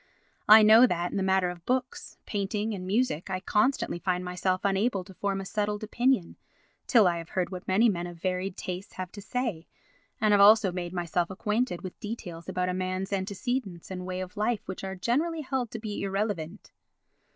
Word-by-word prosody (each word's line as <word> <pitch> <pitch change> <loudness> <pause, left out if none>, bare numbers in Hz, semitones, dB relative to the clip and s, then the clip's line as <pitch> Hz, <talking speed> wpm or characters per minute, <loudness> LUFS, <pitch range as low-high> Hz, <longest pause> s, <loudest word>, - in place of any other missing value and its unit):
I 215 +1 +10
know 220 +4 +8
that 175 -3 -1
in - - -3
the - - 0
matter 190 -1 +2
of 175 -1 -11
books, 255 +3 -2
painting 210 +1 -2
and 185 -2 -6
music 200 -5 0
I 185 -1 -2
constantly 210 -1 +1
find 180 0 -1
myself 185 +1 -1
unable 200 0 +1
to 190 - -13
form 195 +1 -2
a 195 - -5
settled 210 +1 -2
opinion 240 -3 +1 0.5
till 225 -6 +6
I 170 -1 +1
have 165 - -9
heard 185 0 0
what 180 0 -7
many 205 +5 +4
men 175 -5 -1
of 175 -1 -9
varied 185 +1 -2
tastes 185 +2 -6
have 185 -1 -6
to 205 - -9
say, 210 -6 -3 0.5
and 215 -1 +3
have 205 -1 +5
also 205 -1 +7
made 175 -1 -4
myself 175 -1 -1
acquainted 210 +1 -1
with 185 - -8
details 175 -7 -7
about 180 0 -1
a 180 - -1
man's 185 +1 -2
antecedents 195 -1 -3
and 180 -1 -5
ways 185 0 -3
of 185 +3 -11
life 215 +1 -1
which 190 - -6
are 190 0 -4
generally 310 - 0
held 260 -4 -2
to 225 - -6
be 215 -2 -5
irrelevant. 195 -2 -3
195 Hz, 195 wpm, -28 LUFS, 180-215 Hz, 0.5 s, I